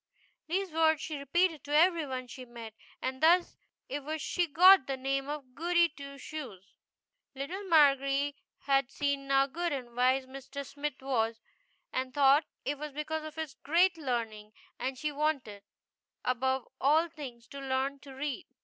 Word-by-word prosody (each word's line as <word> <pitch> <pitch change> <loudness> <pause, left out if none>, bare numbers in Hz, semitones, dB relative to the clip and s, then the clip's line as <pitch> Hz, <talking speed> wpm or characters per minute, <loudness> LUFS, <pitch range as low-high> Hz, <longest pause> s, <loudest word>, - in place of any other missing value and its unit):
These 375 +2 -1
words 320 -1 +3
she 310 -2 -5
re 280 - -8
peated 340 +1 +2
to 290 +1 -1
every 330 -1 +4
one 255 -1 -4
she 255 +1 -9
met, 235 -3 -10 0.3
and 260 0 -3
thus 345 +3 +4 0.3
it 285 +1 -4
was 310 +2 -3
she 350 +3 0
got 360 +1 +7
the 270 -1 -2
name 275 +1 -2
of 285 -4 -6
Goody 340 +3 +3
Two 280 -1 -10
Shoes 255 - -8 0.6
Little 325 +9 -5
Margery 280 -3 +4 0.3
had 275 -2 +2
seen 280 -1 -2
now 275 0 +4
good 340 +5 -3
and 250 -4 -5
wise 255 +2 +3
Mr. 270 +1 -8
Smith 285 0 -5
was, 225 -4 0 0.5
and 255 0 -2
thought 285 +2 +5 0.2
it 285 0 -2
was 300 -1 -6
because 310 +2 -3
of 310 0 -8
his 315 -3 -4
great 340 +7 +2
learning; 230 -7 -3 0.3
and 260 0 -3
she 300 +3 -2
wanted, 280 -9 -2 0.6
above 260 +1 0
all 310 +5 +4
things, 270 -8 -9
to 280 - -8
learn 270 +1 -1
to 280 -1 -12
read. 275 0 -4
280 Hz, 165 wpm, -31 LUFS, 260-310 Hz, 0.6 s, got